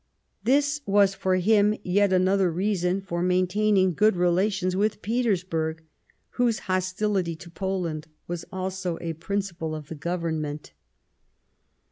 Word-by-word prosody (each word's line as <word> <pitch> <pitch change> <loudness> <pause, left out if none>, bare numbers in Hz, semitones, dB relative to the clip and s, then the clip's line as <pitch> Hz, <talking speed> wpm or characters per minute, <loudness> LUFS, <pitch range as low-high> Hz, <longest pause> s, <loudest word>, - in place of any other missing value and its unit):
This 285 +3 +2
was, 200 -1 +4
for 190 -1 0
him, 210 +3 +3
yet 200 +2 +2
another 185 0 +3
reason 185 +1 0
for 175 -2 -3
main 180 +1 +3
taining 190 -2 +2
good 215 +2 +4
relations 185 +1 +1
with 210 +2 0
Petersburg, 180 -9 -1 0.5
whose 240 -3 +1
hostility 185 -1 0
to 170 +1 -12
Poland 175 -4 -3 0.2
was 175 -1 -4
also 185 -2 -3
a 165 -1 -3
principle 170 -2 -3
of 150 -2 -8
the - - -5
Government. 160 -2 -3
185 Hz, 125 wpm, -26 LUFS, 170-205 Hz, 0.5 s, was